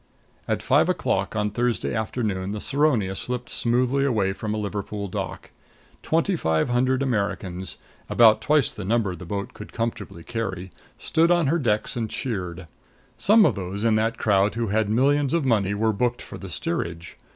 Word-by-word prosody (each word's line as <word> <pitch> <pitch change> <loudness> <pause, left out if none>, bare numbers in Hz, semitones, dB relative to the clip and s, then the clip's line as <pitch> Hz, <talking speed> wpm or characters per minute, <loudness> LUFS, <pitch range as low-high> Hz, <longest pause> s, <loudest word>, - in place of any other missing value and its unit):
At - - -1
five - - +3
o'clock - - 0
on 105 -1 0
Thursday 120 +2 -1
afternoon 105 -4 -2
the 105 - -4
Saronia 130 -9 +1
slipped 125 +3 -4
smoothly 125 +3 +1
away 110 -8 +1
from 105 +2 -4
a 110 - -1
Liverpool 100 0 -4
dock. 90 - -5 0.5
Twenty 165 +4 +1
five 80 - 0
hundred 130 +2 +2
Americans 100 -6 -2 0.3
about 110 -2 +6
twice 150 -3 +2
the - - -7
number 105 -1 +1
the 90 0 -10
boat 100 +2 -4
could 105 - -10
comfortably 110 -7 -4
carry 95 -5 -4 0.3
stood 165 +1 +2
on 175 -2 +3
her 165 +5 +2
decks 110 -3 0
and 115 -2 -2
cheered. 95 -9 -4 0.5
Some 215 +1 +6
of - - +3
those 100 +1 -5
in 115 -1 +3
that 110 +1 +1
crowd 100 0 +2
who 115 -2 -1
had 105 0 +1
millions 140 +6 +2
of 165 -5 0
money 100 -5 +2
were 110 +1 +1
booked 120 +3 -1
for - - -9
the - - -8
steerage. 85 0 -4
110 Hz, 175 wpm, -24 LUFS, 100-125 Hz, 0.5 s, about